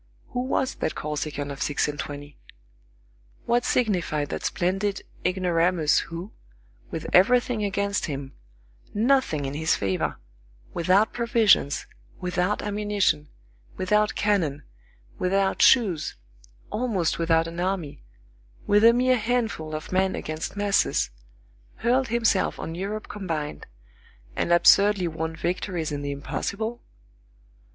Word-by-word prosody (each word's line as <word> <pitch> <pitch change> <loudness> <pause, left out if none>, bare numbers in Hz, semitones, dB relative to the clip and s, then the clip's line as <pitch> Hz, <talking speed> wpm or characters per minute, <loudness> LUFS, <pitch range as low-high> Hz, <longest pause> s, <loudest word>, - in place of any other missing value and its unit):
Who - - -3
was 260 +1 0
that - - -3
Corsican 150 -1 -3
of 140 - -8
six 145 - +1
and 145 -1 -5
twenty? 145 -1 -7 1.1
What 240 +1 +2
signified 175 - 0
that - - -4
splendid 195 +3 -1 0.2
ignoramus, 175 -3 +2
who, 170 +5 -6 0.6
with 165 - -5
everything 240 +3 +4
against 200 0 -1
him, 140 -3 -5 0.6
nothing 225 - +2
in 135 - -3
his 160 +2 +1
favor, 95 -2 -1 0.6
without 185 +5 +3
provisions, 230 - +3 0.3
without 180 +2 -1
ammunition, 205 -7 0 0.5
without 210 +3 +2
cannon, 165 -9 0 0.6
without 195 +1 +1
shoes, 195 -12 +4 0.6
almost 215 -10 0
without 165 -1 +3
an 170 +1 -7
army, 180 - -2 0.6
with 205 +1 +4
a 230 +1 +8
mere 255 +1 +3
handful 220 -9 -1
of 155 - -7
men 190 +1 +1
against 155 +5 -5
masses, 205 - +1 0.6
hurled 255 +2 +1
himself 230 -4 +1
on 165 - -5
Europe 200 +5 -4
combined, 165 -7 -4 0.7
and - - -1
absurdly 195 +2 +5
won 160 0 -4
victories 175 -1 -2
in 145 -1 -3
the 145 - -3
impossible? 210 - -4
185 Hz, 115 wpm, -25 LUFS, 155-210 Hz, 1.1 s, a